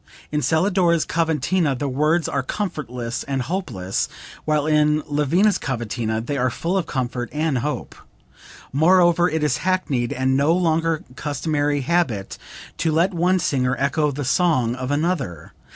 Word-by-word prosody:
In 150 0 0
Celidora's 170 0 +2
cavatina 160 -2 0
the 140 - -2
words 150 +5 +1
are 140 - -1
comfortless 130 - -4
and 135 -2 -2
hopeless, 120 - -2 0.4
while 150 -1 +1
in 150 0 +3
Lavina's 155 +8 +2
cavatina 115 -3 -2
they 140 +5 -3
are 130 0 +2
full 170 +9 -2
of 185 -4 0
comfort 125 -2 -3
and 150 -3 0
hope. 150 +5 -3 0.8
Moreover 175 +3 +4
it 160 0 -1
is 150 - +1
hackneyed 150 -10 0
and 130 +1 +1
no 145 +4 +3
longer 165 -2 +1
customary 145 0 -1
habit 130 - -1 0.4
to 165 - +1
let 170 +5 +2
one 180 +2 +2
singer 130 -6 0
echo 150 +2 +1
the 145 0 -4
song 130 -6 +2
of 130 0 -5
another. 145 - -2
150 Hz, 145 wpm, -22 LUFS, 130-170 Hz, 0.8 s, Moreover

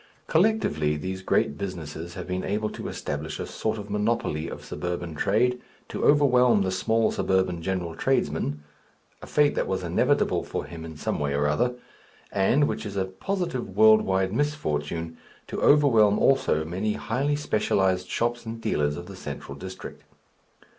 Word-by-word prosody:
Collectively 160 - +2
these 95 +5 -4
great 75 -5 +1
businesses 85 -3 -6
have - - -5
been 90 0 -3
able 105 +2 -1
to - - -6
establish 75 +2 -4
a - - -3
sort 110 0 -2
of 105 -1 -7
monopoly 105 -7 0
of - - -8
suburban 85 -1 -4
trade, 125 +10 +1 0.3
to - - -4
overwhelm 125 -7 +5
the 95 - -1
small 110 +4 +1
suburban 95 -3 0
general 90 -2 -2
tradesman 75 -2 0 0.6
(a - - -9
fate 150 -1 +3
that - - -1
was - - -2
inevitable - - +1
for - - -4
him 85 -1 -9
in 80 -2 -8
some - - -2
way 70 -1 -1
or 75 +1 +1
other), 120 +13 +1 0.6
and 120 +9 +3
which - - -3
is 100 -2 -6
a 95 - +1
positive 125 - -4
world 110 0 +7
wide 95 0 0
misfortune 85 - -2 0.3
to - - -5
overwhelm 115 -8 +5
also 105 - +2
many 95 +6 -1
highly 135 +8 -1
specialized 95 -9 +1
shops 120 +1 -1
and 115 0 -6
dealers 75 -10 0
of 85 - -7
the 100 +1 -10
central 70 -4 -7
district. 95 +6 -9
95 Hz, 160 wpm, -26 LUFS, 85-115 Hz, 0.6 s, world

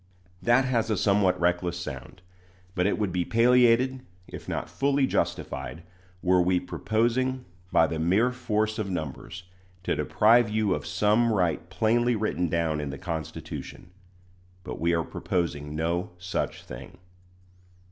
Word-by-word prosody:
That 120 +2 +4
has 115 -3 0
a 110 - +1
somewhat 100 -2 +2
reckless 90 0 0
sound; 75 +2 -8 0.5
but 90 -1 +1
it - - 0
would 105 -3 -1
be 90 0 0
palliated, 125 +3 +4 0.3
if - - -9
not - - -3
fully 140 0 +1
justified, 80 - -3 0.4
were 90 -1 +4
we 90 0 +2
proposing, 120 +7 -1 0.3
by 80 - +5
the 80 0 -3
mere 95 +10 +3
force 110 -3 -1
of 105 -2 -2
numbers, 85 +2 -5 0.4
to - - 0
deprive 115 +1 +4
you 105 -2 +1
of - - -4
some 110 +3 +2
right 90 -4 0
plainly 115 +5 +2
written 100 -5 -1
down 80 -2 0
in 75 - -4
the 70 - -6
Constitution. 85 +1 -6 0.7
But - - -6
we 85 +1 +2
are 85 - 0
proposing 75 -4 -3
no 85 +5 -1
such 90 +1 -3
thing. 65 +1 -10
95 Hz, 145 wpm, -27 LUFS, 85-115 Hz, 0.7 s, by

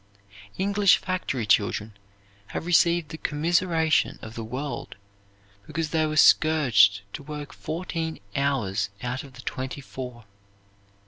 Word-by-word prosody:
English 200 0 +4
factory 175 - -2
children 105 +1 +1 0.5
have - - -5
received 170 -2 +3
the 160 - -8
commiseration 165 +1 +1
of 110 - -8
the 115 - -5
world 135 +4 -5 0.7
because 160 -2 -3
they 160 -1 +2
were 155 0 -3
scourged 120 -14 +5
to - - -6
work 150 0 -7
fourteen 165 0 -4 0.2
hours 110 -8 0
out 125 +2 -3
of 135 -2 -13
the 125 +1 -12
twenty 130 +2 -4
four. 125 -4 -8
145 Hz, 125 wpm, -26 LUFS, 125-160 Hz, 0.7 s, scourged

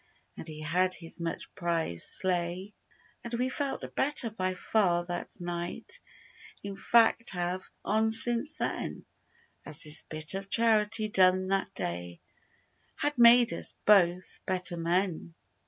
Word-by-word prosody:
And - - -7
he 155 -1 -7
had 180 +4 +1
his 165 0 -6
much 170 -1 -5
prized 165 - -2
sleigh. 185 +2 -2 0.5
And 235 0 -4
we 250 +2 -1
felt 275 +1 -3
better 270 -5 +2
by 185 -3 -2
far 180 -4 +1
that 175 +2 -6
night 175 - -6 0.6
In 200 -1 -6
fact 230 +3 +3
have, 180 +1 -3 0.2
on 220 +1 +2
since 240 +6 +2
then; - - -4 0.6
As 155 - -4
this 155 +1 +3
bit 155 +1 -2
of 195 0 -6
charity 220 -1 +3
done 185 -2 +3
that 195 0 -1
day 85 0 -4 0.8
Had 290 -3 -1
made 235 0 +7
us - - -2
both, 185 -3 +3
better 185 -1 0
men. 170 0 -1
185 Hz, 135 wpm, -29 LUFS, 170-220 Hz, 0.8 s, made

